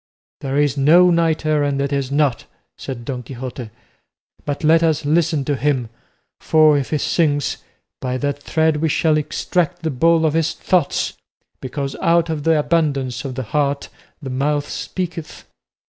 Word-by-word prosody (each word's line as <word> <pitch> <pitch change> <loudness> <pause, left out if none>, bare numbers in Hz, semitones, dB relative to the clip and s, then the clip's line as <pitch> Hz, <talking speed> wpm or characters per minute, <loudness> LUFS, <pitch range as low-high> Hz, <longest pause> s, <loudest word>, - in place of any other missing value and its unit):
"There 135 0 -3
is 145 -1 +1
no 170 +6 +6
knight 165 -2 +1
errant 145 -2 +1
that 140 +1 -1
is 140 -1 -2
not," 145 -4 +1 0.3
said 120 -3 -7
Don 125 -1 -4
Quixote; 125 -1 -7 0.8
"but 145 +1 -3
let 160 +2 +5
us 160 -3 +1
listen 155 -1 +1
to 145 - 0
him, 130 -4 0 0.5
for, 155 -1 +4
if 140 -2 -1
he 155 - 0
sings, 145 -1 0 0.4
by 130 0 -2
that 145 +1 -2
thread 160 0 +1
we 160 +1 0
shall 155 +1 +2
extract 175 +3 -1
the 160 - -1
ball 165 +4 +3
of 155 - +1
his 165 -1 0
thoughts; 175 -6 0 0.5
because 135 +1 -4
out 170 0 +2
of 150 -2 -4
the 165 -1 +4
abundance 145 -6 0
of 130 -2 -5
the 130 - -3
heart 140 +4 -1 0.3
the 135 - -5
mouth 145 +2 0
speaketh." 175 -4 -5
145 Hz, 160 wpm, -20 LUFS, 135-160 Hz, 0.8 s, no